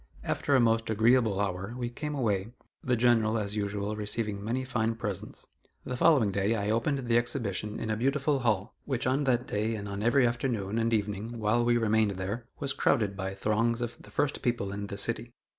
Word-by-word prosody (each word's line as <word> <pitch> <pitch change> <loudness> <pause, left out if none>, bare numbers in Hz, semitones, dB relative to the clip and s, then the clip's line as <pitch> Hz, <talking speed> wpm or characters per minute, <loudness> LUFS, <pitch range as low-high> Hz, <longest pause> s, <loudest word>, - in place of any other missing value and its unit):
After 140 - +1
a - - +6
most 115 -1 +2
agreeable 110 -1 +3
hour 100 +2 -2
we 120 -1 -2
came 150 +4 -4
away 105 -7 0 0.4
the 125 - +2
General, 115 -2 +3
as 105 -1 -2
usual, 100 0 -2
receiving 105 -1 -3
many 125 +4 -1
fine 115 -3 0
presents. 105 -5 -5 0.4
The 125 - -4
following 130 -7 +4
day, 100 +3 +1
I 105 -1 -1
opened 125 +4 0
the 115 0 +4
exhibition 110 -4 -2
in 110 - -2
a - - +1
beautiful 135 +4 +1
hall, 110 -3 0
which 130 -4 -2
on 135 +3 +1
that 125 -1 +2
day 110 +1 -1
and 105 -1 -5
on 100 0 -4
every 120 +4 +4
afternoon 120 -3 -1
and 115 0 +1
evening 105 +1 -2
while 110 +2 +2
we 120 0 +3
remained 110 -3 +2
there, 105 +6 -4
was 140 -2 -2
crowded 105 -7 +1
by 95 0 -4
throngs 115 +4 +1
of 120 -1 -4
the 105 - -14
first 140 +6 -1
people 120 -5 -1
in 100 0 -4
the 100 - -6
city. 115 +3 -3
115 Hz, 200 wpm, -29 LUFS, 105-120 Hz, 0.4 s, a